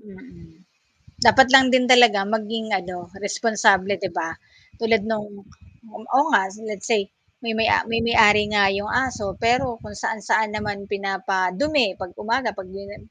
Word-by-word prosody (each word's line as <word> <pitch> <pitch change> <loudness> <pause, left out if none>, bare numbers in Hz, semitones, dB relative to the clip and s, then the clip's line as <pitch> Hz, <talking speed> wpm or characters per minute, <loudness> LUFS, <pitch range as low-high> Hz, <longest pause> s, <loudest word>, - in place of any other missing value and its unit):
Hmm. 205 -3 -17 0.8
Dapat 265 0 +7
lang 265 -1 +8
din 255 -1 +3
talaga 240 -5 +6
maging 220 +1 -4
ano, 180 -1 -8 0.3
responsable 200 -2 +1
'di 190 -2 -5
ba? 165 - -3 0.5
Tulad 225 -2 +1
nang 220 -2 -3 0.9
oo 270 - +5
nga 190 - +5 0.3
let's 205 -2 -8
say, 215 - +3 0.4
may 230 - -3
may 225 - +2
a - - +4
may 230 - 0
may-ari 210 -3 +5
nga 205 -1 +3
'yong 205 +1 -4 0.2
aso 220 -5 -6 0.2
pero 250 +3 +2 0.2
kung 210 - -11
saan-saan 215 0 -1
naman 205 -2 -5
pinapadumi 195 +7 -1
'pag 185 -2 -8
umaga, 230 +1 -1
'pag 190 -1 -9
'di 195 +1 -9
na 205 - -11
210 Hz, 155 wpm, -21 LUFS, 195-230 Hz, 0.9 s, lang